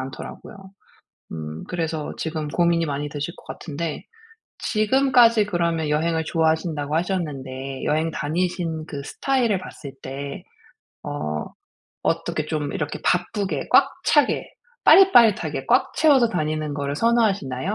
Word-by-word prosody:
않더라고요. 135 Hz, +9 st, -8 dB, 0.8 s
음 80 Hz, 0 st, -6 dB
그래서 160 Hz, -3 st, -3 dB
지금 155 Hz, -2 st, -3 dB
고민이 170 Hz, +1 st, +2 dB
많이 145 Hz, 0 st, -3 dB
되실 150 Hz, +3 st, -5 dB
것 -, -, -16 dB
같은데. 155 Hz, 0 st, -5 dB, 0.5 s
지금까지 230 Hz, -1 st, +4 dB
그러면 170 Hz, -4 st, 0 dB
여행을 160 Hz, +2 st, +1 dB
좋아하신다고 160 Hz, -2 st, 0 dB
하셨는데 135 Hz, -7 st, -3 dB
여행 155 Hz, +2 st, +1 dB
다니신 165 Hz, 0 st, -2 dB
그 140 Hz, -3 st, -6 dB
스타일을 240 Hz, -, 0 dB
봤을 145 Hz, -6 st, -9 dB
때 140 Hz, +6 st, -6 dB, 0.6 s
어 75 Hz, -, -3 dB, 0.6 s
어떻게 165 Hz, -1 st, -1 dB
좀 150 Hz, -3 st, -2 dB
이렇게 150 Hz, -, -3 dB
바쁘게 190 Hz, +3 st, -1 dB
꽉 -, -, +6 dB
차게 -, -, +3 dB, 0.4 s
빠릿빠릿하게 240 Hz, -, +5 dB
꽉 -, -, +3 dB
채워서 275 Hz, -7 st, +5 dB
다니는 155 Hz, -2 st, -2 dB
거를 140 Hz, 0 st, -3 dB
선호하시나요? 205 Hz, -, +1 dB
160 Hz, 305 characters per minute, -23 LUFS, 145-190 Hz, 0.8 s, 꽉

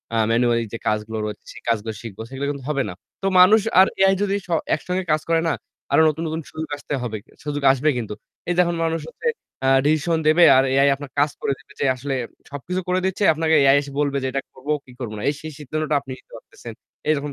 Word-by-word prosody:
আ -, -, +2 dB
manually 115 Hz, 0 st, +2 dB
যে -, -, -2 dB
কাজগুলো 110 Hz, +1 st, -1 dB
রয়েছে 105 Hz, -, -6 dB
সে -, -, -11 dB
কাজগুলো 110 Hz, -1 st, 0 dB
শিখব। 110 Hz, -4 st, -9 dB
সেগুলো 135 Hz, +1 st, -4 dB
কিন্তু 140 Hz, -2 st, -7 dB
হবে 140 Hz, -3 st, +1 dB
না। -, -, -6 dB, 0.3 s
তো 195 Hz, -, 0 dB
মানুষ 210 Hz, +4 st, +7 dB, 0.2 s
আর 190 Hz, -, +8 dB
AI 195 Hz, 0 st, +5 dB
যদি 200 Hz, 0 st, 0 dB
স -, -, -21 dB, 0.3 s
একসঙ্গে 180 Hz, +4 st, -3 dB
কাজ 155 Hz, 0 st, +2 dB
করেনা, 165 Hz, 0 st, +2 dB, 0.4 s
আরো -, -, +5 dB
নতুন, 160 Hz, +2 st, -3 dB
নতুন, 160 Hz, +1 st, -3 dB
সুযোগ 160 Hz, 0 st, -5 dB
আসতে 145 Hz, -, -6 dB
হবে। 110 Hz, -3 st, -3 dB, 0.3 s
সুযোগ 145 Hz, -1 st, -3 dB
আসবে 140 Hz, +3 st, +1 dB
কিন্তু। 110 Hz, -3 st, -4 dB, 0.4 s
এই -, -, +2 dB
দেখুন 175 Hz, -1 st, +3 dB
মানুষ 165 Hz, 0 st, 0 dB
হচ্ছে 470 Hz, -, -5 dB, 0.4 s
আ -, -, +3 dB, 0.2 s
ডিসিশন 155 Hz, +2 st, +2 dB
দেবে 165 Hz, +3 st, +6 dB
আর 130 Hz, -, +5 dB
AI 140 Hz, +1 st, +5 dB
আপনার 140 Hz, -1 st, -10 dB
কাজ 145 Hz, +1 st, +4 dB
করে -, -, 0 dB
দেবে -, -, -21 dB
যে 145 Hz, -, +1 dB
আসলে 135 Hz, +2 st, -3 dB, 0.4 s
সবকিছু 180 Hz, +7 st, -4 dB
করে 180 Hz, +1 st, +1 dB
দিচ্ছে 190 Hz, +2 st, -1 dB
আপনাকে 160 Hz, 0 st, +2 dB
AI 135 Hz, 0 st, +6 dB
এসে 140 Hz, -, -9 dB
বলবে 140 Hz, -1 st, +1 dB
যে -, -, 0 dB
এটা 135 Hz, -, -1 dB
করবো 135 Hz, +3 st, -5 dB
কি 125 Hz, -, -15 dB
করবো 115 Hz, -4 st, -5 dB
না? -, -, -6 dB
এই -, -, 0 dB
সেই 155 Hz, 0 st, -7 dB
সিদ্ধান্তটা 155 Hz, +1 st, -2 dB
আপনি 135 Hz, -2 st, -10 dB
নিতে -, -, -23 dB
পারতেছেন। 115 Hz, 0 st, -11 dB, 0.4 s
এইরকম 145 Hz, -1 st, 0 dB
145 Hz, 225 wpm, -22 LUFS, 130-165 Hz, 0.4 s, আর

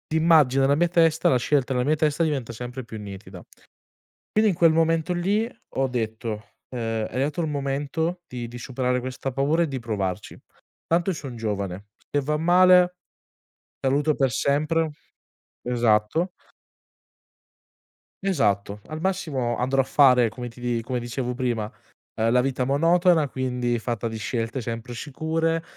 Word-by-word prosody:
immagino 155 Hz, -5 st, +4 dB
nella 140 Hz, +1 st, +4 dB
mia 175 Hz, +4 st, +3 dB
testa 165 Hz, -2 st, +3 dB
la 130 Hz, -, +4 dB
scelta 135 Hz, +1 st, +1 dB
nella 125 Hz, 0 st, 0 dB
mia 155 Hz, +1 st, +3 dB
testa 155 Hz, +2 st, +1 dB
diventa 140 Hz, -7 st, -1 dB
sempre 125 Hz, +2 st, -6 dB
più 110 Hz, -2 st, -8 dB
nitida. 95 Hz, -3 st, -9 dB, 0.9 s
Quindi, 215 Hz, -1 st, +3 dB
in -, -, -1 dB
quel 165 Hz, -1 st, +5 dB
momento 165 Hz, +1 st, +2 dB
lì, 195 Hz, +6 st, +1 dB, 0.3 s
ho 135 Hz, 0 st, +2 dB
detto, 110 Hz, -2 st, -3 dB, 0.3 s
ehm: 115 Hz, -3 st, -2 dB
"È -, -, -15 dB
arrivato 145 Hz, +5 st, 0 dB
il 160 Hz, -, -1 dB
momento 145 Hz, +5 st, -2 dB
di 120 Hz, -6 st, -6 dB
di 120 Hz, +1 st, -9 dB
superare 125 Hz, 0 st, -1 dB
questa 130 Hz, +1 st, -5 dB
paura 150 Hz, +6 st, +2 dB
e -, -, -1 dB
di 135 Hz, -3 st, -4 dB
provarci. 100 Hz, -6 st, -4 dB, 0.5 s
Tanto, 170 Hz, +3 st, +2 dB
io 185 Hz, -, 0 dB
son 130 Hz, -4 st, -7 dB
giovane, 100 Hz, -3 st, -4 dB, 0.2 s
se 145 Hz, -, +1 dB
va 150 Hz, +2 st, -1 dB
male, 180 Hz, +2 st, +5 dB, 0.9 s
saluto 145 Hz, +3 st, +2 dB
per 135 Hz, -2 st, +1 dB
sempre." 155 Hz, +6 st, +1 dB, 0.7 s
Esatto. 120 Hz, -, +1 dB, 1.9 s
Esatto, 105 Hz, -, 0 dB
al 155 Hz, 0 st, -6 dB
massimo 150 Hz, -11 st, -1 dB
andrò 130 Hz, +2 st, +2 dB
a -, -, -1 dB
fare 125 Hz, -4 st, +5 dB
come 120 Hz, +2 st, -7 dB
ti 120 Hz, +1 st, -12 dB
di 120 Hz, -1 st, -1 dB
come 125 Hz, +1 st, -3 dB
dicevo 125 Hz, +1 st, -3 dB
prima, 120 Hz, -4 st, -1 dB, 0.5 s
ehm, 115 Hz, +1 st, +1 dB
la 125 Hz, -, +4 dB
vita 130 Hz, 0 st, -1 dB
monotona 165 Hz, +3 st, +3 dB
quindi 125 Hz, -2 st, -1 dB
fatta 115 Hz, -1 st, -3 dB
di 110 Hz, -, -5 dB
scelte 115 Hz, +4 st, -3 dB
sempre 115 Hz, +2 st, -5 dB
sicure, 160 Hz, +4 st, -1 dB
130 Hz, 155 wpm, -24 LUFS, 120-160 Hz, 1.9 s, quel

